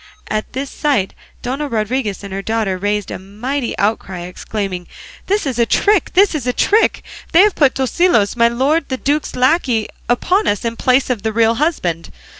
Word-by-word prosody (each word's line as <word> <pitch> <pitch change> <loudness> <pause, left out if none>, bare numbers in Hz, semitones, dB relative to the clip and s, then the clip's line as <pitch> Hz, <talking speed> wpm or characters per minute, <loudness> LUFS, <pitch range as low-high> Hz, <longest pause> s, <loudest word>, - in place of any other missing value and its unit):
At 215 0 -3
this 270 +2 -4
sight 270 -11 0 0.3
Dona 270 +4 -2
Rodriguez 220 -3 -2
and 195 -1 -7
her 195 - -3
daughter 220 -2 -1
raised 205 +1 -1
a - - -5
mighty 235 +7 -4
outcry, 195 -3 -1
exclaiming, 180 0 -5 0.4
"This 405 -1 +1
is 255 -4 -2
a 235 - +4
trick! 410 - +2
This 395 +1 +4
is 280 -6 -3
a 250 - +1
trick! 435 - +2 0.3
They 335 - +7
have 415 -1 +4
put 280 -4 +3
Tosilos, 265 - +2
my 235 -1 +4
lord 275 +6 0
the 260 - -2
duke's 290 +3 -1
lacquey, 255 -4 +2 0.2
upon 365 - +1
us 205 +3 0
in 230 0 -2
place 255 +2 +2
of 235 -5 -2
the 220 +1 -1
real 225 +1 +3
husband. 225 - -1
240 Hz, 185 wpm, -17 LUFS, 210-285 Hz, 0.4 s, They